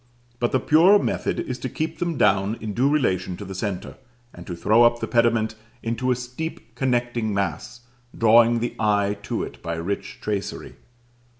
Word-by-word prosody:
But 120 Hz, -, 0 dB
the 130 Hz, -, +2 dB
purer 170 Hz, +9 st, +6 dB
method -, -, -1 dB
is 125 Hz, -1 st, -5 dB
to 130 Hz, -, -4 dB
keep 160 Hz, +5 st, -4 dB
them 170 Hz, -4 st, -1 dB
down 100 Hz, +3 st, +2 dB
in 110 Hz, -2 st, -5 dB
due 130 Hz, +6 st, +2 dB
relation 95 Hz, -11 st, 0 dB
to 100 Hz, -, -8 dB
the 95 Hz, -, -7 dB
centre, 95 Hz, -1 st, -4 dB, 0.4 s
and 85 Hz, -, -12 dB
to 90 Hz, -, -4 dB
throw 110 Hz, +7 st, +3 dB
up 120 Hz, 0 st, +5 dB
the -, -, -2 dB
pediment 115 Hz, -2 st, +2 dB, 0.3 s
into 115 Hz, +3 st, -1 dB
a 125 Hz, -, +3 dB
steep 125 Hz, 0 st, -7 dB
connecting 120 Hz, -4 st, -1 dB
mass, 100 Hz, +4 st, -3 dB, 0.4 s
drawing 115 Hz, +1 st, +5 dB
the 120 Hz, -, -3 dB
eye 105 Hz, -1 st, +1 dB
to -, -, -3 dB
it -, -, -9 dB
by 85 Hz, 0 st, -3 dB
rich 90 Hz, +5 st, -4 dB
tracery. 100 Hz, -2 st, -4 dB
115 Hz, 180 wpm, -23 LUFS, 100-125 Hz, 0.4 s, purer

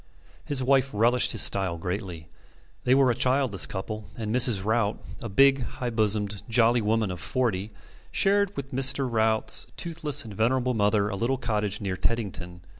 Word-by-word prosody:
His 140 Hz, -4 st, 0 dB
wife 135 Hz, +1 st, +2 dB
relished 120 Hz, +4 st, +3 dB
his 115 Hz, -, +5 dB
style 95 Hz, -4 st, +1 dB
greatly. 90 Hz, -2 st, -5 dB, 0.6 s
They 125 Hz, -, +4 dB
were 135 Hz, -2 st, +4 dB
a -, -, +1 dB
childless 130 Hz, -4 st, +1 dB
couple, 105 Hz, +2 st, -6 dB
and 110 Hz, -2 st, -4 dB
Mrs. 120 Hz, -6 st, +4 dB
Rout, 110 Hz, -1 st, 0 dB, 0.2 s
a 115 Hz, -, -5 dB
big, 135 Hz, +6 st, +4 dB
high 120 Hz, 0 st, -5 dB
bosomed, 105 Hz, -2 st, 0 dB
jolly 120 Hz, 0 st, +3 dB
woman 110 Hz, -1 st, 0 dB
of 90 Hz, -, -7 dB
forty, 110 Hz, -, -2 dB, 0.4 s
shared 200 Hz, 0 st, +1 dB
with 135 Hz, -1 st, -6 dB
Mr. 135 Hz, +1 st, +1 dB
Rout's 110 Hz, -2 st, +1 dB
toothless 155 Hz, -5 st, -1 dB
and 110 Hz, -, -9 dB
venerable 125 Hz, +4 st, 0 dB
mother 105 Hz, -1 st, +1 dB
a 100 Hz, -, -4 dB
little 120 Hz, +6 st, -1 dB
cottage 105 Hz, -4 st, -2 dB
near 95 Hz, -2 st, -3 dB
Teddington. 90 Hz, -5 st, -3 dB
115 Hz, 165 wpm, -26 LUFS, 100-130 Hz, 0.6 s, his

